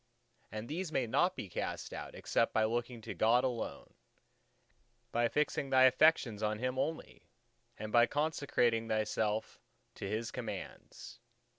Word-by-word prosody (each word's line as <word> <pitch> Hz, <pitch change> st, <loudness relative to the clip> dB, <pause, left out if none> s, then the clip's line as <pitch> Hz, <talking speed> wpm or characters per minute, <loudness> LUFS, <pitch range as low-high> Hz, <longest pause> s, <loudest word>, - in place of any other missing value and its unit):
And 110 Hz, +2 st, -5 dB
these 165 Hz, +3 st, -3 dB
may 130 Hz, -, +1 dB
not 180 Hz, +11 st, +2 dB
be -, -, -5 dB
cast 90 Hz, -, -4 dB
out, -, -, -7 dB
except -, -, 0 dB
by 110 Hz, -, +4 dB
looking 120 Hz, +1 st, -2 dB
to -, -, -6 dB
God 115 Hz, +3 st, +3 dB
alone, 125 Hz, -3 st, -4 dB, 1.2 s
by 120 Hz, 0 st, +2 dB
fixing 150 Hz, -1 st, 0 dB
thy 130 Hz, -1 st, +5 dB
affections 130 Hz, -4 st, +4 dB
on 105 Hz, 0 st, 0 dB
Him 130 Hz, +3 st, -2 dB
only, 160 Hz, +3 st, -4 dB, 0.5 s
and 110 Hz, 0 st, -6 dB
by 120 Hz, +1 st, +6 dB
consecrating 140 Hz, -7 st, +1 dB
thyself 110 Hz, 0 st, -1 dB, 0.3 s
to 95 Hz, -, -6 dB
His 110 Hz, +2 st, -2 dB
commands. 110 Hz, -3 st, -7 dB
120 Hz, 140 wpm, -33 LUFS, 110-130 Hz, 1.2 s, by